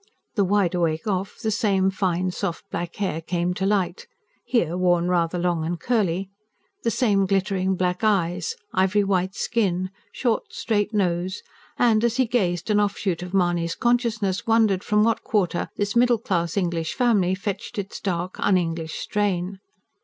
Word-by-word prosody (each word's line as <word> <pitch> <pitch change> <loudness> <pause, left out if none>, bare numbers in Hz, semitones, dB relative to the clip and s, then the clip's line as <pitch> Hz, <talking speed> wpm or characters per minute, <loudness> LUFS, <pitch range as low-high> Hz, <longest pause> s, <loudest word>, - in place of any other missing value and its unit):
The 205 - +2
wide 195 -2 +2
awake 165 -3 0
off, 195 -2 -2
the 220 - -2
same 195 -4 +2
fine, 185 -2 0
soft, 180 -1 -3
black 170 0 -4
hair 190 -6 -2
came 175 +1 -1
to 190 +2 -1
light 205 - 0 0.4
here, 230 -9 +1
worn 175 -1 +2
rather 175 -1 +1
long 175 -2 0
and 170 +1 -2
curly 195 -5 0 0.5
the - - +1
same 205 -5 +2
glittering 190 -1 +1
black 180 +1 -1
eyes, 200 - +1 0.2
ivory 190 +2 +3
white 190 0 0
skin, 185 -7 0 0.2
short, 235 -4 -1
straight 210 -2 0
nose; 185 -2 -1 0.3
and, 225 -2 +3
as 235 +1 +1
he 260 - +4
gazed, 200 -5 0
an 210 - +4
offshoot 200 -4 0
of 180 0 -6
Mahony's 175 -2 +1
consciousness 230 -5 0
wondered 220 -4 +3
from 210 0 +3
what 225 0 +2
quarter 180 -5 0
this 205 +1 -1
middle 240 0 +4
class 175 -5 -1
English 170 -4 -1
family 210 -8 +2
fetched 200 +2 -5
its 200 0 -4
dark, 180 -1 -3
un 190 - +3
English 165 -2 -2
strain. 195 -2 -1
190 Hz, 160 wpm, -24 LUFS, 175-210 Hz, 0.5 s, he